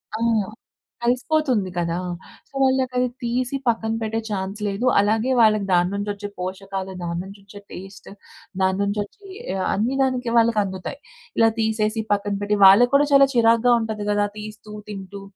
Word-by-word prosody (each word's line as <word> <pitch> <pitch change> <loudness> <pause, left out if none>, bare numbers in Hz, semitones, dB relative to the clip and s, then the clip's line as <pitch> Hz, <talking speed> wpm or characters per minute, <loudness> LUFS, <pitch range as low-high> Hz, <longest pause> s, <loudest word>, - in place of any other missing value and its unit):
ఆ! - - -4 0.8
కలిసిపోతుంది 250 -3 +1
కదా! 170 0 -1 0.5
సో, - - -39
వాళ్ళకది 260 -1 +1 0.2
తీసి 245 +2 -1
పక్కన 225 -1 +1
పెట్టే 225 0 -2
ఛాన్స్ 195 0 -4
లేదు, 200 +5 -2
అలాగే 220 +5 +1
వాళ్ళకి 215 -3 +4
దాని 175 0 +3
నుంచి 205 +1 -3
వచ్చే 205 0 -7
పోషకాలు, 190 +1 -5
దాని 170 0 -3
నుంచి 195 +2 -12
వచ్చే 200 +1 -12
టేస్ట్, 190 +1 -10 0.5
దాని 190 0 +2
నుంచి 200 +1 -1
వచ్చే, 395 - -16 0.3
ఆహ్, 185 - -1
అన్ని 230 +7 0
దానికి 250 -3 0
వాళ్ళకి 230 -1 +3
అందుతాయి. 190 +7 -6 0.4
ఇలా 225 0 +5
తీసేసి, 220 0 0
పక్కన 205 0 0
పెట్టి 205 +1 0
వాళ్ళకి 220 +6 +7
కూడా 285 +1 +5
చాలా 275 -1 +7
చిరాకుగా 230 0 +4
ఉంటది 220 -2 -4
కదా! 205 0 +2
తీస్తూ 215 0 -9 0.2
తింటూ 200 -1 -8
215 Hz, 155 wpm, -22 LUFS, 195-240 Hz, 0.8 s, వాళ్ళకి